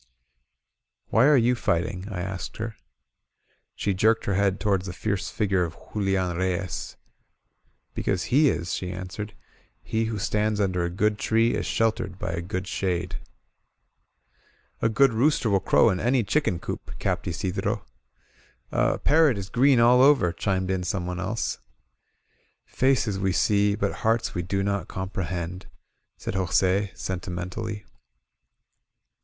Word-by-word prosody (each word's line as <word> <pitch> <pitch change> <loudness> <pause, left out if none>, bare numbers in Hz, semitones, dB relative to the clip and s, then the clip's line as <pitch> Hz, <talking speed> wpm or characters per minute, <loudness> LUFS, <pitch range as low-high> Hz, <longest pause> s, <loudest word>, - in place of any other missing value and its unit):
"Why 120 +5 +5
are 150 -2 +6
you 120 0 +3
fighting?" 90 -4 -1
I 95 -4 -4
asked 95 0 -5
her. 110 0 -4 1.0
She 100 - -1
jerked 110 +4 +2
her 100 - 0
head 100 0 +1
toward 100 -4 +1
the 90 - -5
fierce 100 0 -2
figure 100 -4 +1
of 85 -1 -4 0.2
Ju 105 - -2
lian 95 -3 0
Reyes. 95 0 -2 1.0
"Because 95 -3 -1
he 145 +3 +4
is," 85 -5 -2
she 90 -1 -3
answered. 95 +3 -6 0.5
"He 110 0 -1
who 110 -1 -3
stands 105 +1 0
under 90 -3 +1
a 85 - -1
good 105 +4 0
tree 115 +1 +2
is - - -2
sheltered 110 -5 0
by - - -3
a 85 +1 -3
good 95 +1 -4
shade." 90 -2 -2 1.6
A 115 - +3
good 125 +3 +4
rooster 120 -1 +2
will 100 - +4
crow 110 +3 +4
in 90 - -1
any 120 +1 +2
chicken 105 - +1
coop," 85 - -7
capped - - -2
Isidro. 90 -8 -2 0.9
*^A - - +1
parrot 150 -6 +4
is 100 0 -6
green 130 0 +4
all 120 +2 +6
over," 135 -11 +5
chimed 95 +1 -1
in 95 -1 0
someone 90 -1 -3
else. 100 +5 -2 1.1
Faces 125 -7 +1
we 95 0 +1
see, 100 +2 +2
but 100 -2 -2
hearts 115 +1 +1
we 90 - -1
do 95 +3 -1
not 100 -3 -1
comprehend," 90 -1 -4 0.5
said - - -5
Jos£, 95 +1 +1
sentimentally. 90 +3 -4
100 Hz, 145 wpm, -25 LUFS, 90-110 Hz, 1.6 s, are